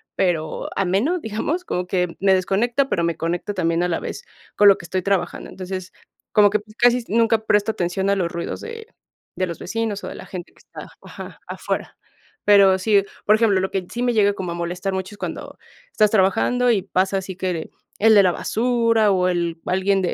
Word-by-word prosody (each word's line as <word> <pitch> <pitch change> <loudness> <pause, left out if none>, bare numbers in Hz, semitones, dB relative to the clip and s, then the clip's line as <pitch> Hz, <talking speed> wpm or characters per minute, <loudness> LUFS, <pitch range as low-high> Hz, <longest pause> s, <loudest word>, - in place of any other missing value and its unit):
pero 165 -4 -1
ameno, 200 - +1
digamos, 300 - -3
como 180 - -2
que 180 -2 -1
me 195 0 +4
desconecta, 235 +9 +1
pero 170 - 0
me 170 -1 0
conecta 175 +5 -2
también 170 -2 0
a - - +1
la 165 - -1
vez - - -6 0.3
con 205 - +5
lo 195 - +5
que 170 - -10
estoy 185 +1 -2
trabajando. 195 -1 -1
Entonces, 185 0 -6 0.4
como 205 -1 +5
que, 210 +1 +1
pues, 215 +1 -18
casi 240 0 +3
nunca 225 0 +2
presto 210 +1 +2
atención 190 0 -2
a 200 - +3
los 180 -3 -1
ruidos 170 -1 -4
de 455 -1 -8 0.5
de 185 - 0
los 170 - -6
vecinos 220 0 -3
o - - -5
de - - -7
la - - -10
gente 180 -2 -8
que - - -30
está - - -11
ajá, - - -10
afuera. - - -4 0.5
Pero 195 -2 +6
sí, 200 0 +3 0.2
por 210 - +5
ejemplo, 215 -4 +3
lo 190 - -2
que 190 -2 -2
sí 240 - -4
me 245 -1 +1
llega 205 -2 +4
como 180 -3 -5
a - - -6
molestar 175 +3 -3
mucho 190 +2 -4
es - - -24
cuando - - -6 0.3
estás 215 - +3
trabajando 225 +5 +2
y 205 - +2
pasa 190 +1 0
así 190 -1 -5
que 180 -3 -3 0.3
el 220 +1 +6
de 200 - +7
la 185 - +3
basura 230 0 +1
o 185 -1 +2
el 170 -2 -1
alguien 190 +1 +1
de 180 - -1
195 Hz, 210 wpm, -21 LUFS, 180-220 Hz, 0.5 s, de